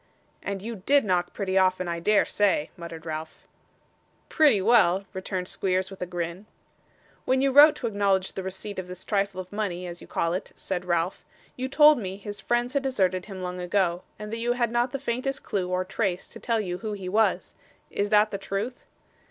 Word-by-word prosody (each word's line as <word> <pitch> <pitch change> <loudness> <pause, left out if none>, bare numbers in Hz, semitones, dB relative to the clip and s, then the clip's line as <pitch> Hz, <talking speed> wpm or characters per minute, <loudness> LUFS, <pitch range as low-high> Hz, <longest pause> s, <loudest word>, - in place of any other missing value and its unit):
'And 200 -1 -4
you 230 0 -5
DID 275 +7 +3
knock 180 -2 +1
pretty 190 -2 0
often, 185 -1 +2
I 170 0 -2
dare 210 +4 +3
say?' 195 -7 +1
muttered 170 -1 -9
Ralph. 155 0 -6 0.8
'Pretty 295 -10 +5
well,' 195 -3 +4
returned 185 -1 -3
Squeers 185 0 -1
with 195 - -11
a 180 - -2
grin. 175 +3 -4 0.8
'When 260 0 +2
you 275 0 +3
wrote 295 +3 +8
to - - -6
acknowledge 200 -3 +1
the 190 - -4
receipt 190 +2 -5
of 185 - -5
this 180 0 -9
trifle 200 -2 0
of 185 0 -7
money 185 -4 -2
as 175 0 -7
you - - -12
call 165 0 0
it,' 185 - -4
said 180 -2 -4
Ralph, 175 +1 -1 0.3
'you 255 +1 -3
told 300 0 +7
me 190 -3 -5
his 205 0 -7
friends 240 +1 0
had 280 - +1
deserted 190 -9 0
him 190 -3 -7
long 180 0 -4
ago, 180 -1 0 0.2
and 210 +1 -7
that 230 - -3
you 240 +1 +1
had 240 -2 0
not 240 +1 +1
the 275 - -2
faintest 270 +1 -3
clue 185 -3 -2
or 185 0 0
trace 190 -1 -2
to - - -11
tell 230 -2 0
you 180 -4 -3
who 215 -2 -4
he 195 -3 -6
was. 215 +4 +1 0.4
Is 205 0 -1
that 210 0 +4
the 200 - -3
truth? 200 +6 -4
195 Hz, 205 wpm, -26 LUFS, 180-225 Hz, 0.8 s, wrote